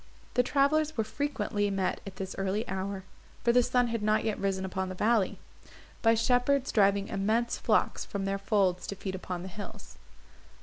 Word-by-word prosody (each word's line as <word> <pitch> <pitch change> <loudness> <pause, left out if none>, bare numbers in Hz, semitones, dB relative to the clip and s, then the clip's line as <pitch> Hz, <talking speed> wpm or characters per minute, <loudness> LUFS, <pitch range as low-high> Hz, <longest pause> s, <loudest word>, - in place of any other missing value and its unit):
The 250 - +4
travellers 290 +4 +2
were 225 - +2
frequently 215 -5 -1
met 195 -2 -1
at 190 - -8
this 190 0 -5
early 195 +4 -1
hour, 190 +1 -3 0.4
for 235 - +4
the 250 - +6
sun 245 0 +2
had 230 -1 -2
not 215 +1 +2
yet 215 -2 -1
risen 190 -1 -1
upon 190 0 -3
the 185 - -5
valley, 215 0 +2 0.6
by 225 0 +5
shepherds 250 +4 +2
driving 200 -1 +3
immense 220 +4 0
flocks - - +1
from 200 -1 -4
their 195 0 -1
folds 195 -3 +1
to 200 - -4
feed 190 0 -5
upon 180 -1 -5
the - - -6
hills. 205 +2 -9
205 Hz, 180 wpm, -29 LUFS, 190-235 Hz, 0.6 s, the